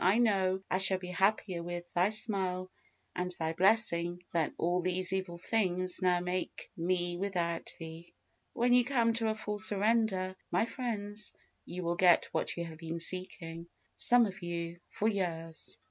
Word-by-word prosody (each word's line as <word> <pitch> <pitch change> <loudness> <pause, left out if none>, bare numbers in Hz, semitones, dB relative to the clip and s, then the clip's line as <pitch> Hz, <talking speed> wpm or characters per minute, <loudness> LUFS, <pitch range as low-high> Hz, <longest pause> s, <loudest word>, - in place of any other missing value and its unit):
I 190 +5 +5
know 190 -5 +2
I 185 - 0
shall 190 0 +5
be 180 -1 -7
happier 190 -1 +1
with 175 0 -6
Thy 180 +3 +3
smile 190 -4 -1 0.4
and 180 0 -1
Thy 160 0 -1
blessing 175 -2 +2
than 165 -3 +1
all 175 +2 +1
these 185 +1 -1
evil 185 -2 -2
things 185 -2 0
now 180 -1 +3
make 180 +1 -4
me 175 0 0
without 175 -3 -1
Thee." 165 +1 -9 0.4
When 245 +1 +3
you 250 0 +6
come 235 -3 +2
to 225 -1 +1
a 220 - 0
full 210 -1 -4
surrender, 205 -3 +2
my 225 - +2
friends, 210 -4 -4 0.3
you 180 +1 -5
will 170 0 -1
get 175 -2 +5
what - - -1
you 170 - -2
have 160 -1 -9
been 165 0 -4
seeking, 170 -1 -3 0.3
some 245 -1 +5
of 200 0 -6
you, 170 0 -4
for 215 - -1
years. 165 -6 -3
185 Hz, 165 wpm, -32 LUFS, 175-205 Hz, 0.4 s, you